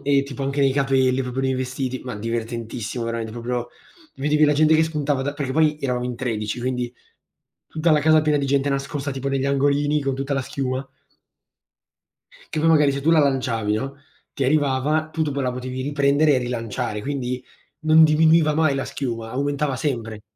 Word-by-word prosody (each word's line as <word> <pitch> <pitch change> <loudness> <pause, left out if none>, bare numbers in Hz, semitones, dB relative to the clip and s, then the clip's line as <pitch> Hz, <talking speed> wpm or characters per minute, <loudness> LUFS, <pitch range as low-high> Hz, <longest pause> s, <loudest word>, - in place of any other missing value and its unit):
e 140 -1 +3
tipo 140 0 -7
anche 140 +1 -1
nei 135 -1 +3
capelli 135 -2 +2
proprio 130 +1 -3
nei 130 0 +1
vestiti, 130 0 -3
ma 125 -4 -6
divertentissimo 115 +1 -4
veramente 115 -1 -3
proprio, 120 +1 -3 0.5
vedevi 150 +2 +2
la 150 0 +3
gente 155 +1 +4
che 160 - +5
spuntava 150 -4 -1
da 145 +2 -3
perché 140 -3 -3
poi 155 0 +3
eravamo 125 -3 -2
in 125 -1 -4
13, 110 -3 -3
quindi 125 -1 -2 0.8
tutta 160 +1 +1
la 150 - +4
casa 155 +1 +4
piena 150 -1 +2
di 140 - -1
gente 140 +1 +1
nascosta, 140 +1 -3
tipo 135 +1 -4
negli 135 -1 0
angolini, 145 +2 +1
con 135 -1 -1
tutta 135 +1 -3
la 140 - 0
schiuma 130 +1 -3 1.7
che 155 - -1
poi 165 - +3
magari 150 -3 +4
se 140 0 -4
tu 165 - +3
la 165 - +5
lanciavi 125 -7 +1
no, 135 +5 -4 0.4
ti 140 - -4
arrivava, 150 +2 +1
tu 160 - -4
dopo 140 -2 -2
la 125 -1 -1
potevi 130 +1 -5
riprendere 145 +1 +3
e - - +3
rilanciare 115 -3 -3
quindi 130 -3 -3 0.4
non 160 0 +6
diminuiva 155 0 +4
mai 155 -3 +2
la 135 - -2
schiuma, 115 -4 -4
aumentava 140 +1 -1
sempre. 115 -6 -3
135 Hz, 185 wpm, -22 LUFS, 125-145 Hz, 1.7 s, non